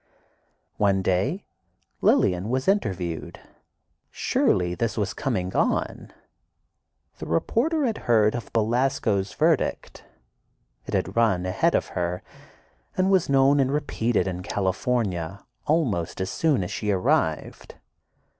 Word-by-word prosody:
One 100 -2 +2
day 110 - 0 0.6
Lillian 90 +3 +2
was 130 +2 -1
interviewed. 95 - -1 0.7
Surely 90 -1 +1
this 110 +3 -2
was 100 -2 -1
"coming 95 -10 -2
on." - - -1 1.1
The - - -6
reporter 275 - +1
had 225 -3 -1
heard 110 -2 +4
of 120 -1 -6
Belasco's 110 -4 0
verdict; - - 0 0.8
it - - -2
had - - -2
run 110 -6 +2
ahead 115 - +1
of - - 0
her, 90 0 -3 0.7
and 190 +1 +2
was 190 -6 +2
known 140 +1 +4
and 135 -1 +2
repeated 120 -8 0
in 90 -1 -4
California 95 -1 -2 0.2
almost 125 - 0
as 95 0 -2
soon 150 - +1
as 90 - -5
she 105 - -3
arrived. 95 -3 0
105 Hz, 115 wpm, -25 LUFS, 95-135 Hz, 1.1 s, heard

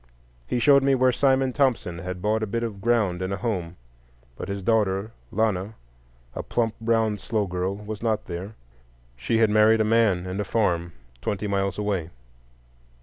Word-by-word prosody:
He - - -1
showed 140 +3 +5
me 135 0 +3
where 130 0 +4
Simon 130 0 +2
Thompson 120 - 0
had 90 +1 -6
bought 110 +1 +1
a 110 - -1
bit 115 +3 -2
of 105 -4 -5
ground 105 -6 +1
and 95 +1 -2
a 100 - -1
home; 95 -7 -3 0.6
but 90 - -7
his 100 -1 -4
daughter 105 -1 +1 0.2
Lana, 105 -1 0 0.6
a - - -4
plump, 115 -2 -1
brown, 110 -2 +1
slow 110 +1 -1
girl, 90 +1 -2
was 105 +1 -7
not 110 -2 0
there. 95 +5 -6 0.6
She 65 - -1
had 110 -2 +4
married 110 +1 +5
a - - +4
man 105 -5 +2
and 95 +2 -4
a - - +1
farm 85 -5 0 0.3
twenty 105 +1 -2
miles 100 -1 -1
away. 100 -6 -2
105 Hz, 175 wpm, -25 LUFS, 95-115 Hz, 0.6 s, showed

